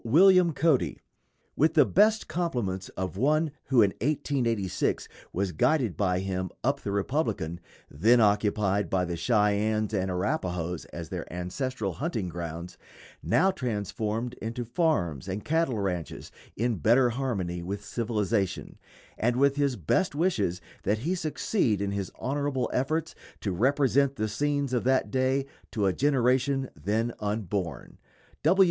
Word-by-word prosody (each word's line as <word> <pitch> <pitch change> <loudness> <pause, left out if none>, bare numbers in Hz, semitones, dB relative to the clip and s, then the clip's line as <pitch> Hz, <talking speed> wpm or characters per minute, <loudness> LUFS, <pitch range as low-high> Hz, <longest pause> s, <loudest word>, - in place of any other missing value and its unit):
William 180 +7 +6
Cody_: 155 -3 +1 0.6
With 155 +3 +2
the - - +7
best 215 +2 +3
compliments 120 - -2
of 95 0 -3
one 150 +6 +2
who 125 -5 +5
in 100 - +2
1886 120 - 0 0.2
was 95 +1 -1
guided 125 - +1
by 90 0 +1
him 95 -1 -2
up - - +1
the - - -4
Republican, 100 - -1 0.3
then 115 +12 +3
occupied 105 -2 +2
by 90 -1 +1
the 85 -1 -3
Cheyennes 105 +2 +1
and 95 -2 0
Arapahoes 90 -2 -2
as 85 -2 -8
their - - -6
ancestral 95 - -3
hunting 115 - -3
grounds; 85 0 -6 0.4
now 190 - +3
transformed 115 - -3
into 115 +2 -4
farms 100 - 0
and 95 +2 -4
cattle 160 -6 +1
ranches, 90 -5 -3 0.2
in 120 -1 0
better 120 - +4
harmony 100 -9 -2
with 100 +3 -5
civilization, 105 -3 -1 0.4
and 120 +2 +2
with 140 +2 +3
his 140 -3 +1
best 130 - 0
wishes 115 - +1 0.2
that 105 +3 +1
he 155 +12 -1
succeed 155 - 0
in 100 0 -1
his 100 -2 -3
honorable 140 -2 -1
efforts 155 +5 0 0.3
to 100 - -1
represent 135 +6 +2
the 110 -1 -1
scenes 145 +4 -1
of 125 - +1
that 130 +1 +2
day 130 +1 +1 0.2
to 105 -3 -1
a 95 - +2
generation 135 0 +1
then 110 +4 -1
unborn. 100 - -3
110 Hz, 140 wpm, -28 LUFS, 95-135 Hz, 0.6 s, the